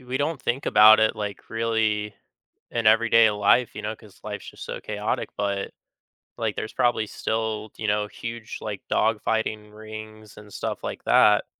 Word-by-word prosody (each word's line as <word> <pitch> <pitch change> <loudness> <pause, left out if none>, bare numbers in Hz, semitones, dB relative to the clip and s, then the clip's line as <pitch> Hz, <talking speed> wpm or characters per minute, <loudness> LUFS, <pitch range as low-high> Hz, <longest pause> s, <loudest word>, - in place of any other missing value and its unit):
we 130 +1 -4
don't 145 0 -1
think 130 +4 -2
about 110 +1 +8
it, 110 0 +2
like, 105 -1 -6
really 110 -2 0 0.6
in 115 -2 -1
everyday 115 0 +6
life, 105 +4 +2
you - - -5
know, 105 +1 -4
'cause 105 -3 -18
life's 105 -1 -6
just - - -10
so - - -5
chaotic, - - -3
but, 100 -1 -2 0.7
like, 110 -3 -2
there's 110 - -4
probably 120 -3 +1
still, 110 -1 -3
you 110 - -3
know, 105 0 +1
huge, 115 +1 -7
like, 105 -2 -5
dogfighting 110 -1 0
rings 110 0 -10
and 105 -1 -13
stuff - - -4
like - - -5
that 105 0 +5
110 Hz, 165 wpm, -25 LUFS, 105-115 Hz, 0.7 s, about